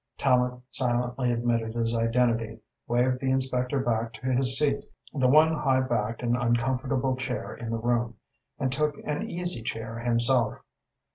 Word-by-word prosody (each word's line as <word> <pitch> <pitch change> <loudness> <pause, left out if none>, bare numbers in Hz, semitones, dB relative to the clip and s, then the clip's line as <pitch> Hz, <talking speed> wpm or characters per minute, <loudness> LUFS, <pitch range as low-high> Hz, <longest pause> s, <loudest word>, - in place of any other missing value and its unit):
Tallente 125 -2 +1
silently 125 0 0
admitted 115 -1 -1
his 115 0 0
identity, 115 -1 +1 0.3
waved 125 +2 +1
the 130 - -1
inspector 130 0 +1
back 115 -2 -1
to 130 +4 -3
his 130 +1 +2
seat 140 -2 +1 0.3
the 130 -3 +2
one 155 +4 +6
high 135 -4 +2
backed 115 -2 -2
and 120 0 +2
uncomfortable 130 +2 0
chair 130 -1 -4
in 115 - -7
the 115 - -1
room 120 0 0 0.4
and 130 - -1
took 150 +2 0
an 150 +10 -2
easy 175 - -1
chair 115 0 -5
himself. 120 0 +2
125 Hz, 150 wpm, -27 LUFS, 115-130 Hz, 0.4 s, one